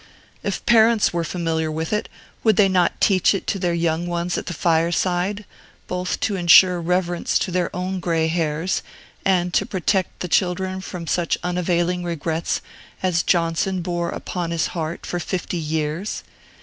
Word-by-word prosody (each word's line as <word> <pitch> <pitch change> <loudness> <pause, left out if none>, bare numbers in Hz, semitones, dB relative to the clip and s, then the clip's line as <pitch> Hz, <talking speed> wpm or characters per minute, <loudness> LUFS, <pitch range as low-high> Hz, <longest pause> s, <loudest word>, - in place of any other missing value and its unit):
If - - -3
parents 225 -3 +4
were 170 -1 0
familiar 165 -1 -1
with 160 +4 -3
it, 210 - -1 0.3
would 220 -3 +4
they 200 +1 +5
not 180 -2 +1
teach 195 0 +4
it 195 - -4
to 195 - -1
their 175 -2 0
young 170 0 0
ones 175 0 -1
at - - -4
the 175 - -3
fireside, 175 +5 +1 0.4
both 180 0 -2
to 205 - 0
insure 180 0 +6
reverence 175 0 0
to 185 - -2
their 180 -1 0
own 185 +1 -2
gray 165 -2 +1
hairs, 165 +1 -1 0.4
and 180 -2 +1
to - - +3
protect 190 0 -1
the 180 - -2
children 185 +1 0
from 180 -2 -6
such 170 0 0
unavailing 180 0 0
regrets 165 -1 -2 0.4
as 180 -2 +2
Johnson 175 +1 +1
bore 175 -1 -2
upon 175 -1 -4
his 170 -1 0
heart 160 -1 -4
for 175 - -3
fifty 180 0 -3
years? 155 +4 -2
175 Hz, 160 wpm, -22 LUFS, 170-185 Hz, 0.4 s, insure